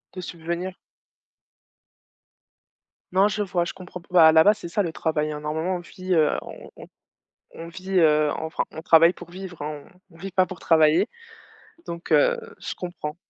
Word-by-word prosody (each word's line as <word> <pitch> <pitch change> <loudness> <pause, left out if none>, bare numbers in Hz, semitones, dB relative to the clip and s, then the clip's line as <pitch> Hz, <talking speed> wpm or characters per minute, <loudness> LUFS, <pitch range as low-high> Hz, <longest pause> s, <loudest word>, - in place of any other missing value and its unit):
De 185 - -5
subvenir? 170 +2 -5 2.4
Non, 190 +2 +5
je 210 0 -2
vois, 175 -3 -1
je - - -5
comprends 180 -1 -10
p 170 - -23
bah, 170 -3 +7
à - - +6
la 160 0 +6
base, 210 +1 +4
c'est 170 - -7
ça 205 +4 0
le 165 -3 -4
travail, 155 -1 -1
hein. 150 - -7
Normalement 160 +5 -2
on 180 - -4
vit, 185 +1 -5
heu, 155 -3 +4
on - - -11
on - - -11 0.7
on 165 0 -8
vit, 185 +2 -9
heu 150 -2 +4
enfin, 160 0 -3
on 160 - -9
travaille 165 +1 +6
pour 175 -1 -12
vivre, 180 -4 -9
hein. 150 -1 -5 0.3
On 165 - -18
on - - -19
vit 195 +2 -7
pas 185 0 +3
pour 185 -1 -9
travailler. 160 +5 +4 0.8
Donc 170 0 -7
heu, - - +4 0.2
je - - -6
comprends. 175 -3 -6
170 Hz, 190 wpm, -24 LUFS, 160-185 Hz, 2.4 s, bah